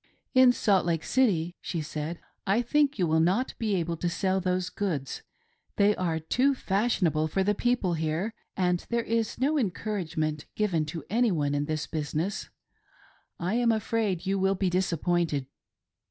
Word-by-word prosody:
" - - -51
In 255 -1 +8
Salt 200 -6 +2
Lake 165 -2 -1
City," 180 -10 +1
she 170 - -3
said, 155 +2 -4 0.2
" - - -25
I 240 - +2
think 290 +2 +2
you 185 - +2
will 160 0 +2
not 185 +10 +2
be 215 -3 0
able 170 -2 -1
to 175 - -1
sell 190 +2 0
those 180 0 -1
goods; 155 -10 -3 0.5
they 205 +1 +4
are 170 -3 -1
too 255 - +1
fashionable 190 - +1
for 190 +5 0
the 205 +2 +2
people 240 -5 +1
here, 160 +7 -1 0.2
and 180 -2 +1
there 235 -1 0
is 230 -1 -1
no 290 +4 +2
encouragement 175 - -2
given 180 -8 +1
to 160 -1 -5
any 235 0 +3
one 145 -4 0
in 145 0 0
this 155 0 -2
business. 155 +5 -3 0.9
I 180 +2 -1
am 235 0 +3
afraid 215 -4 -1
you 195 +1 0
will 190 +1 +2
be 185 -1 0
disappointed." 175 -5 0
185 Hz, 170 wpm, -28 LUFS, 160-215 Hz, 0.9 s, In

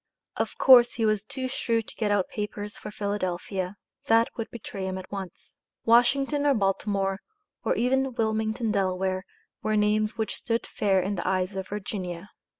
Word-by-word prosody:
Of - - -2
course 245 -2 +8
he 225 - 0
was 215 -2 +2
too 260 +4 -4
shrewd 230 -3 -1
to - - -8
get 215 -2 0
out 205 -2 +2
papers 210 0 -5
for - - -8
Philadelphia. 195 -2 -3 0.3
That 230 +1 +5
would 225 - -4
betray 200 -4 -6
him 190 0 -3
at 185 - -9
once. 195 -3 -8 0.3
Washington 270 +5 +4
or 280 - +4
Baltimore, 195 -1 0 0.4
or - - +1
even 265 +1 +1
Wilmington, 220 0 0
Del., 190 -3 +1
were 185 0 -1 0.5
names 215 +1 +2
which 220 -1 -2
stood 230 0 -1
fair 195 -2 +1
in 200 +1 -2
the 175 - -3
eyes 185 +1 0
of 190 -1 -4
Virginia. 200 -3 -5
210 Hz, 165 wpm, -27 LUFS, 190-230 Hz, 0.5 s, course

